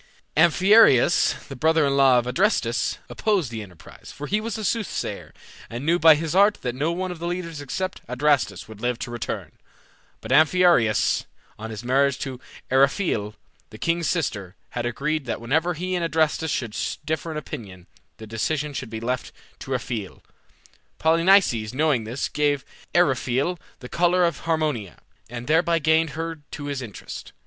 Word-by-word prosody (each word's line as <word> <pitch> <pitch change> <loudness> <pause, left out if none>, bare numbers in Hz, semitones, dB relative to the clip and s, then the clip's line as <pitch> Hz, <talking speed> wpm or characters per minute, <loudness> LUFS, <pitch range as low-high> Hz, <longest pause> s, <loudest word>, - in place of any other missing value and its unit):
Amphiaraus, 175 - +5
the 135 - -8
brother 160 +3 +3
in 140 0 +1
law 135 -2 +5
of 120 - +1
Adrastus, 125 - +1
opposed 195 - 0
the 110 -1 -5
enterprise, 90 -5 -13
for 145 - -7
he 210 +6 0
was 225 -1 -4
a 215 - -5
soothsayer, 225 0 -3 0.4
and 120 +4 -6
knew 170 +2 +3
by 160 -2 +8
his 160 +1 -3
art 200 +3 +5
that 125 - -2
no 145 +6 -1
one 185 +1 -3
of 175 - -8
the 170 - -4
leaders 170 -4 -4
except 185 +7 -4
Adrastus 125 -7 +1
would 110 -1 -12
live 120 0 0
to 120 - -6
return. 120 -1 -5 0.7
But - - -8
Amphiaraus, 155 -6 +4 0.3
on 110 +1 -6
his 110 0 -7
marriage 135 +2 +2
to 130 -3 -5 0.3
Eriphyle, 130 - +1 0.3
the 110 - -11
king's 170 +5 0
sister, 100 - -2 0.2
had 120 0 -2
agreed 150 +4 -2
that 120 - -3
whenever 160 +9 0
he 185 +3 -3
and 175 -2 0
Adrastus 160 -1 +1
should 120 -6 -3 0.3
differ 160 +1 -2
in 155 - -4
opinion, 95 -10 -8 0.3
the 110 - -9
decision 145 +7 -2
should 125 -3 -5
be 110 0 -5
left 125 +2 -3 0.3
to 135 - -9
Eriphyle. 120 -6 -4 0.7
Polynices, 165 - +3
knowing 145 -6 +1
this, 120 +5 -3
gave 145 -2 0 0.3
Eriphyle 140 +1 +1 0.2
the 125 - -8
collar 175 +4 +2
of 170 - -1
Harmonia, 150 - -1 0.3
and 120 0 -6
thereby 165 +3 +3
gained 160 +1 +2
her 165 -1 -4
to 145 - -7
his 140 -2 -3
interest. 110 -5 -9
145 Hz, 165 wpm, -24 LUFS, 120-170 Hz, 0.7 s, by